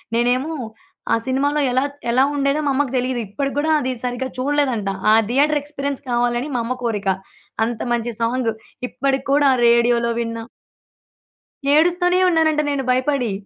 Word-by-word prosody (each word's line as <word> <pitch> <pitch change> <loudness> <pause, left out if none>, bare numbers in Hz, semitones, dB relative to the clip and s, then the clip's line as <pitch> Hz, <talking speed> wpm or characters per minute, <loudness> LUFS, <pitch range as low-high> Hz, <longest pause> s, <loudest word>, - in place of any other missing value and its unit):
నేనేమో 250 +6 +1 0.6
ఆ - - +5
సినిమాలో 285 +3 +1
ఎలా 260 +2 +2
త్ - - -23 0.2
ఎలా 260 +2 +4
ఉండేదో 280 +1 +1
మా 280 - +2
అమ్మకి 270 -2 0
దెలీదు. 250 0 -1
ఇప్పటికి 275 +7 -3
గూడా 315 +2 +1
అది 260 -1 -2
సరిగ్గా 250 +1 -2
చూడలేదంట. 260 -7 0 0.2
ఆ - - +7 0.2
థియేటర్ 290 +4 +3
ఎక్స్‌పీరియన్స్ 280 -1 -4
కావాలని 240 +2 0
మా - - +1
అమ్మ 245 +2 -2
కోరిక. 210 -4 -2 0.6
అంత 230 -1 -2
మంచి 240 0 -1
సాంగ్ 235 0 0 0.4
ఇప్పటికి 270 +1 -1
కూడా 285 0 +4 0.2
రేడియోలో 235 0 +3
విన్నా 230 -1 -3 1.3
ఏడుస్తూనే 355 +3 +3
ఉన్నానంట 315 -2 +2
నేను 280 -2 -1
భయపడి. 255 -2 +1
260 Hz, 145 wpm, -20 LUFS, 240-290 Hz, 1.3 s, ఆ